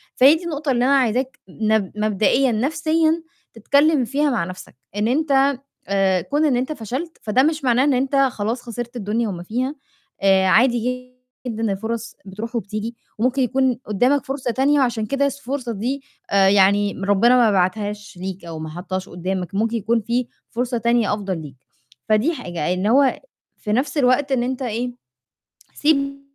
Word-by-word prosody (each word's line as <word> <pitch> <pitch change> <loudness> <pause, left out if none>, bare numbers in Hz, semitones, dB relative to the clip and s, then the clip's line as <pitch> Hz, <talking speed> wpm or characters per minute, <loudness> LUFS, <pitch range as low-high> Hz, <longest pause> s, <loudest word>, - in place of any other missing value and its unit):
فهي 275 +5 +7
دي 340 - -6
النقطة 300 -4 -2
اللي 245 0 +2
أنا 275 +1 +4
عايزاك 255 +1 0
نب 215 -1 0
مبدئيًا 215 +5 +2
نَفْسيًا 315 +6 +1 0.3
تتكلِّم 280 +5 +3
فيها 290 +4 +1
مع 220 -8 0
نَفْسك، 185 -7 -10 0.2
إن 210 +2 0
أنت 275 -1 +2 0.3
آآ 195 -2 +2
كون 295 - 0
إن 275 - +2
أنت 260 +5 -2
فشلت، 265 - -5
فده 235 +5 +3
مش 310 -1 0
معناه 250 0 +3
إن 285 -1 +3
أنت 265 +2 0
خلاص 245 -3 +1
خسرت 240 +1 -6
الدنيا 220 +1 -1
وما 175 -2 -6
فيها، 255 +8 -2 0.5
آآ 190 -1 +4
عادي 250 +3 +2 0.4
جدًا 225 -2 -1
الفُرَص 225 +3 -4
بتروح 210 +5 -7
وبتيجي 220 +1 -4 0.2
وممكن 255 +4 +1
يكون 255 -1 +1
قُدّامك 250 +8 +1
فرصة 265 -3 -2
تانية 280 +4 +2
وعشان 240 -4 +1
كده 280 0 +1
س 280 - -8
الفرصة 260 -2 -4
دي 255 +7 -3 0.3
آآ، 195 -1 +5
يعني 200 +1 +4
ربِّنا 230 +5 +4
ما 230 -3 +4
بعتهاش 205 +2 -1
ليك 190 -1 -6
أو 165 -2 -7
ما 155 - -6
حطّهاش 185 +3 -5
قُدّامك، 180 +1 -4
ممكن 225 +3 0
يكون 225 +2 0
في 240 +3 -1 0.2
فرصة 245 +1 -1
تانية 235 -2 +2
أفضل 190 -5 -4
ليك. 145 -3 -10 0.5
فدي 215 +10 +3
حاجة، 175 - -3
إن 185 +3 -1
هو 265 +3 +3 0.4
في 210 - -5
نَفْس 270 +5 0
الوقت 270 +1 +2
إن 245 -2 +1
أنت 260 +1 -3
إيه، 240 +1 -2 0.8
سيب 275 -2 +1
240 Hz, 170 wpm, -21 LUFS, 205-270 Hz, 0.8 s, فهي